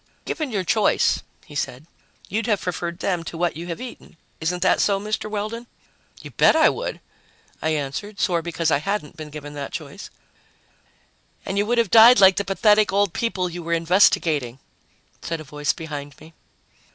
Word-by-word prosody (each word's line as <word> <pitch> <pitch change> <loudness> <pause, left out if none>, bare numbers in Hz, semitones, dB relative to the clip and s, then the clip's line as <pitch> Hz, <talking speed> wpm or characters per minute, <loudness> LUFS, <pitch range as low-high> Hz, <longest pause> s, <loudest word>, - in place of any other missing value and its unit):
"Given 310 -4 -3
your 200 -5 -2
choice," 210 +4 +2 0.2
he 155 - -14
said, 140 -1 -4 0.4
"you'd 220 +3 -2
have 210 -4 +1
preferred 170 -1 -4
them 180 -3 -1
to 165 - -7
what 175 -2 0
you 170 +2 -7
have 170 - -5
eaten. 245 -8 -10 0.2
Isn't 175 +2 -1
that - - +3
so, 200 -1 +2
Mr. 215 +1 -3
Weldon?" 215 +3 -4 0.6
"You - - -9
bet - - +4
I 320 -1 +6
would!" - - -5 0.6
I 160 - 0
answered, 150 +9 -5
sore 175 -4 +1
because 165 -1 -1
I - - +3
hadn't 195 -3 -3
been 155 -1 -8
given 145 -1 -9
that 140 -1 -6
choice. - - -8 1.4
"And 190 - -3
you 205 +1 +1
would 240 +1 +1
have 230 -5 +1
died 230 +1 +8
like 190 -1 +7
the 200 - +1
pathetic 210 +2 +3
old 200 -2 +1
people 195 -6 -1
you 175 0 -6
were 170 0 -2
investigating," 165 -7 +2 0.6
said 165 -1 -4
a - - -8
voice 150 0 -1
behind 145 -3 -8
me. 160 +1 -15
180 Hz, 180 wpm, -22 LUFS, 160-210 Hz, 1.4 s, died